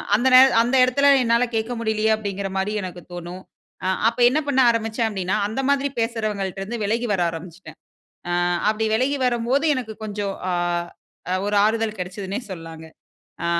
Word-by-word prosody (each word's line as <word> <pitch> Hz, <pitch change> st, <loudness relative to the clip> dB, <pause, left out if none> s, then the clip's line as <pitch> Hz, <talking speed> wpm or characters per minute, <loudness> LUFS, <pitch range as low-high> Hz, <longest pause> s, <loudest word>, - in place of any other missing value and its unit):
அந்த 240 Hz, +5 st, +1 dB
நே -, -, +11 dB, 0.2 s
அந்த 240 Hz, +3 st, 0 dB
இடத்தில 265 Hz, +3 st, +3 dB, 0.2 s
என்னால 235 Hz, +1 st, +2 dB
கேட்க 225 Hz, +2 st, -1 dB
முடியலையே 220 Hz, -1 st, +1 dB
அப்படின்கிற 200 Hz, -2 st, -4 dB
மாதிரி 195 Hz, +2 st, -1 dB
எனக்கு 180 Hz, -1 st, -7 dB
தோணும். 175 Hz, +1 st, -7 dB, 0.4 s
அ -, -, +1 dB, 0.2 s
அப்ப 235 Hz, +2 st, -10 dB
என்ன 285 Hz, +5 st, +1 dB
பண்ண 275 Hz, -2 st, +1 dB
ஆரம்பிச்சேன் 225 Hz, 0 st, -1 dB
அப்படினா, 190 Hz, -1 st, -2 dB
அந்த 220 Hz, +5 st, -4 dB
மாதிரி 280 Hz, 0 st, +1 dB
பேசுறவங்கள்ட்ட 215 Hz, -5 st, -2 dB
இருந்து 230 Hz, +4 st, -5 dB
விலகி 230 Hz, +4 st, -1 dB
வர 190 Hz, -, 0 dB
ஆரம்பிச்சிட்டேன், 165 Hz, +2 st, -10 dB, 0.5 s
அ -, -, -1 dB, 0.4 s
அப்படி 220 Hz, +1 st, 0 dB
விலகி 265 Hz, +5 st, 0 dB
வரும்போது 250 Hz, +4 st, +1 dB
எனக்கு 235 Hz, -4 st, -5 dB
கொஞ்சம், 205 Hz, -2 st, -3 dB, 0.2 s
ஆ -, -, 0 dB, 0.9 s
ஒரு 205 Hz, 0 st, -1 dB
ஆறுதல் 220 Hz, 0 st, 0 dB
கிடைச்சதுன்னே 190 Hz, +2 st, -4 dB
சொல்லாங்க. 165 Hz, -3 st, -9 dB, 0.6 s
ஆ -, -, 0 dB
220 Hz, 160 wpm, -22 LUFS, 195-235 Hz, 0.9 s, நே